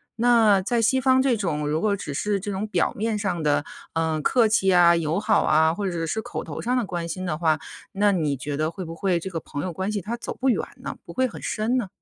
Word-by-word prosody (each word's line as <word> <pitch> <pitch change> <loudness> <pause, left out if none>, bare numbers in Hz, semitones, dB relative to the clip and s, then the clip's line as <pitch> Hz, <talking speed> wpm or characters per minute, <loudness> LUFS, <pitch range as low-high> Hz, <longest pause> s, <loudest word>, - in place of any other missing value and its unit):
那 225 -4 +4
在 235 +4 0
西 260 +4 +2
方 260 0 +4
这 255 -4 +3
种， 155 -8 -2
如 155 +2 0
果 205 -2 +2
只 145 - -6
是 200 +7 -1
这 205 +2 -4
种 200 +2 -3
表 215 - 0
面 220 +1 -1
上 195 -5 -2
的， 145 -1 +1 0.3
呃， 160 -1 0
客 235 - +3
气 195 -3 +3
啊、 175 -1 +6
友 165 +2 0
好 215 - +2
啊， 160 +1 +3
或 200 +1 -2
者 170 -2 -2
是 220 +7 -2
口 - - -5
头 - - -6
上 250 +2 0
的 240 - 0
关 175 -3 -4
心 185 +3 -4
的 165 -4 -1
话， 155 -1 +1 0.3
那 205 +1 +3
你 150 -7 0
觉 145 +3 -4
得 155 +2 0
会 185 0 -7
不 165 - -7
会 175 0 0
这 190 +3 -6
个 165 - -3
朋 145 -2 -6
友 180 -2 -4
关 190 +4 -2
系 205 -1 -2
它 225 +6 -4
走 240 - -7
不 265 0 +3
远 - - 0 0.2
呢？ - - -5
不 - - -10
会 260 0 +1
很 235 - -10
深 235 +2 -1
呢？ 225 -6 -1
190 Hz, 285 characters per minute, -24 LUFS, 165-220 Hz, 0.3 s, 啊